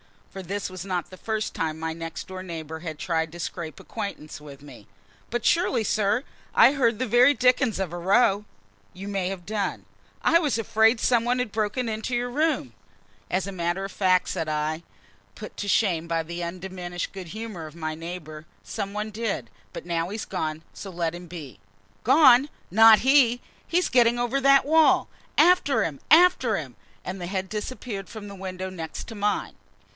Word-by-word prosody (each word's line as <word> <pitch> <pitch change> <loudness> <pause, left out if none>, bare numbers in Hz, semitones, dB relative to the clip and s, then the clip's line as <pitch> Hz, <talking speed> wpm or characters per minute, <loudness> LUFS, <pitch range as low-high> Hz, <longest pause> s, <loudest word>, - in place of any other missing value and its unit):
for 195 - -7
this 195 +2 -4
was 185 -1 -7
not 180 -3 -3
the 185 - -12
first 220 +1 -3
time 160 -1 -2
my 160 0 -3
next 165 -1 -6
door 185 0 -7
neighbor 160 -3 -6
had 160 -2 -6
tried 160 -1 -1
to 175 - -10
scrape 165 -4 -5
acquaintance 200 -10 -6
with 140 -2 -12
me. 145 - -13 0.4
"But 240 -1 -3
surely, 335 -9 +2
sir, 215 +3 +1 0.3
I - - +8
heard 240 -6 +1
the 255 - -1
very 250 +4 +5
dickens 250 -3 +2
of 190 -4 -2
a - - -4
row?" 200 +3 +3 0.5
"You 195 +2 -7
may 195 -2 -1
have 185 -2 -5
done." 205 -1 -3 0.4
"I 335 - +5
was 295 -8 0
afraid 225 +1 +3
some 235 -2 +3
one 245 +1 +1
had 250 -4 -2
broken 220 +3 -1
into 220 +3 -3
your 245 +1 -1
room!" 310 +4 0 0.6
"As 185 0 0
a 195 - -5
matter 175 +1 -2
of 195 - -5
fact," 185 -2 +2
said 165 -4 -2
I, 155 +2 -2 0.5
put - - -10
to 205 - -4
shame 180 -6 +2
by 165 -1 0
the 170 +2 -5
undiminished 175 0 -5
good 190 -2 -8
humor 210 -4 -7
of 155 - -13
my 155 -2 -3
neighbor, 160 -2 -8 0.2
"some 200 -2 -5
one 210 +1 -3
did; 205 - -3 0.2
but - - -7
he's 175 +5 -2
gone 155 -5 -3
now, - - -27
so 200 - -8
let 170 -2 -2
him 175 0 -9
be." 150 - -9 0.5
"Gone? 275 -2 +6 0.2
Not 220 +2 +8
he! 255 -2 +4 0.3
He's 355 +1 +1
getting 240 -1 +4
over 240 +3 0
that 275 0 +5
wall. 320 +2 +4 0.3
After 290 - +4
him 150 -6 -4
after 320 -9 +5
him!" 135 -7 -7 0.3
And 185 +1 -5
the 175 - -5
head 190 0 -3
disappeared 210 -2 -5
from 215 -2 -8
the - - -9
window 190 -1 -5
next 170 +5 -7
mine. 205 -1 -1
195 Hz, 185 wpm, -25 LUFS, 170-230 Hz, 0.6 s, I